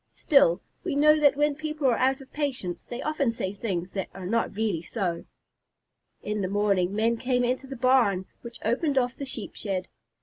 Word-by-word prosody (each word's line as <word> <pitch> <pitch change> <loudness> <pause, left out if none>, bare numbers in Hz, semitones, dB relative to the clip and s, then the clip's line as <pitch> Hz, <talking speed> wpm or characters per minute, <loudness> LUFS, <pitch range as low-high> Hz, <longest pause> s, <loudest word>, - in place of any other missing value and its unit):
Still, 195 - +4 0.2
we - - -2
know 305 +2 +5
that 290 -2 +5
when 295 +1 +2
people 305 0 -4
are 250 -3 +5
out 265 +2 +1
of 265 - -15
patience 260 - -3
they 240 - -6
often 295 -5 0
say 195 -4 -3
things 190 -4 -3
that 195 -2 -4
are 190 -2 -7
not 225 +2 0
really 210 -6 0
so. 175 -2 -3 1.0
In 210 0 -2
the 185 - 0
morning, 200 -1 +1
men 230 +2 +2
came 250 0 +1
into 255 +2 -1
the 270 - -6
barn, 240 -7 +3 0.2
which 235 -1 -8
opened 275 +5 +1
off 250 -1 +1
the 280 - -5
Sheep 235 -5 -4
shed. 190 -3 -3
235 Hz, 195 wpm, -27 LUFS, 195-270 Hz, 1.0 s, know